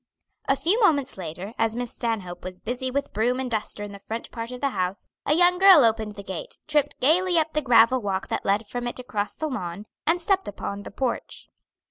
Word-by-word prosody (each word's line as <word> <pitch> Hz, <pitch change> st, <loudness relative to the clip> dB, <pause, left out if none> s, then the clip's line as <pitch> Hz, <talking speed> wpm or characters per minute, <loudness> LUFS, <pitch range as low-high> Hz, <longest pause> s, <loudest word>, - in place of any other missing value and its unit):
A 270 Hz, -, +4 dB
few 360 Hz, -, +1 dB
moments 290 Hz, -, +3 dB
later, 180 Hz, +4 st, -7 dB
as 225 Hz, 0 st, +1 dB
Miss 245 Hz, -1 st, -4 dB
Stanhope 195 Hz, -7 st, -3 dB
was 185 Hz, 0 st, -7 dB
busy 250 Hz, +3 st, -3 dB
with 280 Hz, +2 st, -3 dB
broom 245 Hz, +4 st, +1 dB
and 255 Hz, -2 st, -3 dB
duster 215 Hz, -1 st, -2 dB
in 205 Hz, -, -7 dB
the 200 Hz, -, -10 dB
front 225 Hz, +3 st, -6 dB
part 230 Hz, 0 st, -6 dB
of 250 Hz, -, -7 dB
the 280 Hz, -, +1 dB
house, 185 Hz, -1 st, -2 dB, 0.2 s
a 295 Hz, -, +4 dB
young 355 Hz, +1 st, +5 dB
girl 380 Hz, -7 st, +9 dB
opened 220 Hz, -2 st, 0 dB
the 200 Hz, -, -8 dB
gate, 190 Hz, -3 st, -6 dB
tripped 300 Hz, -2 st, +1 dB
gayly 350 Hz, +6 st, +3 dB
up 315 Hz, 0 st, +1 dB
the 305 Hz, -, +1 dB
gravel 250 Hz, -1 st, +5 dB
walk 195 Hz, -2 st, -2 dB
that -, -, -2 dB
led 205 Hz, +3 st, +1 dB
from 245 Hz, +3 st, -4 dB
it 240 Hz, -, -4 dB
across 210 Hz, -5 st, -3 dB
the 315 Hz, -, -3 dB
lawn, 205 Hz, -, -4 dB, 0.2 s
and 335 Hz, +2 st, +3 dB
stepped 385 Hz, +2 st, +1 dB
upon 200 Hz, 0 st, -5 dB
the -, -, -8 dB
porch. 250 Hz, +3 st, -4 dB
240 Hz, 220 wpm, -25 LUFS, 205-285 Hz, 0.2 s, girl